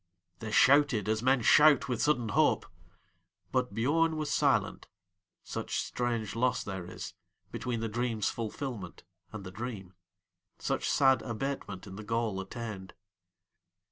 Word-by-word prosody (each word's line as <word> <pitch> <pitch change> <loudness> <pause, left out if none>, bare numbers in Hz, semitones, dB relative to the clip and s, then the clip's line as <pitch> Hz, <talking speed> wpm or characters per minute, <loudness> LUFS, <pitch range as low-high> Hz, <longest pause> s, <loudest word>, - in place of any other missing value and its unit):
They 110 - -5
shouted 130 -2 +4
as 110 0 +1
men 130 -1 +3
shout 150 +2 +6
with 125 -3 -1
sudden 125 -7 +1
hope; - - +2 0.9
But 125 -1 0
Biörn 160 +7 +2
was 155 -1 -3
silent, - - +1 0.6
such - - -4
strange 115 -4 -2
loss 125 +2 +1
there 95 -3 -5
isBetween 115 +5 -7
the 115 - -1
dream's 115 -1 -1
fulfilment 115 -4 -5 0.3
and 110 -3 -7
the 95 - -8
dream, 100 -3 -6 0.6
Such - - -1
sad 135 -2 +4
abatement 115 -5 -4
in 95 - -9
the 110 - -7
goal 110 -2 -1
attained. 95 -2 -7
115 Hz, 130 wpm, -30 LUFS, 105-130 Hz, 0.9 s, shout